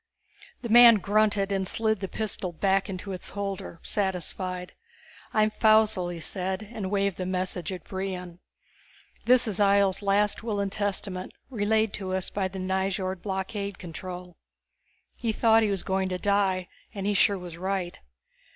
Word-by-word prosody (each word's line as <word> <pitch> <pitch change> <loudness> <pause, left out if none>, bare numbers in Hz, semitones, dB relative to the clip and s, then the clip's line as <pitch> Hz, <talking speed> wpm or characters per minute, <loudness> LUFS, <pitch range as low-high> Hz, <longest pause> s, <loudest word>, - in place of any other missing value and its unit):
The 235 - -4
man 235 0 +9
grunted 205 0 +2
and 190 -1 0
slid 220 0 +1
the 195 - -3
pistol 195 -2 -2
back 195 +4 +1
into 195 +1 -5
its 185 -2 -5
holder, 195 -4 -5
satisfied. 185 -1 -1 0.6
"I'm 215 0 +3
Faussel," 215 -4 +3
he 170 - -6
said, 190 +4 -4
and 205 -4 -4
waved 200 -1 0
the 185 - -3
message 185 -2 -2
at 185 -3 -6
Brion. 185 -2 -5 0.9
"This 250 0 +5
is 210 -3 -2
Ihjel's 200 -1 +3
last 205 +1 +2
will 220 -3 -2
and 200 -1 -1
testament, 195 -2 -3 0.2
relayed 220 -1 +1
to 185 -1 -2
us 190 -1 -2
by 195 -2 -1
the 190 +1 -8
Nyjord 190 0 -1
blockade 200 0 -3
control. 180 +1 -8 0.8
He 230 - -1
thought 225 +1 +4
he 215 - +2
was 195 -2 -1
going 190 -1 0
to 185 - -2
die 190 -2 +1 0.3
and 195 -1 -4
he 205 - +2
sure 200 0 +3
was 175 -2 -8
right. 185 -1 -3
195 Hz, 160 wpm, -27 LUFS, 185-205 Hz, 0.9 s, man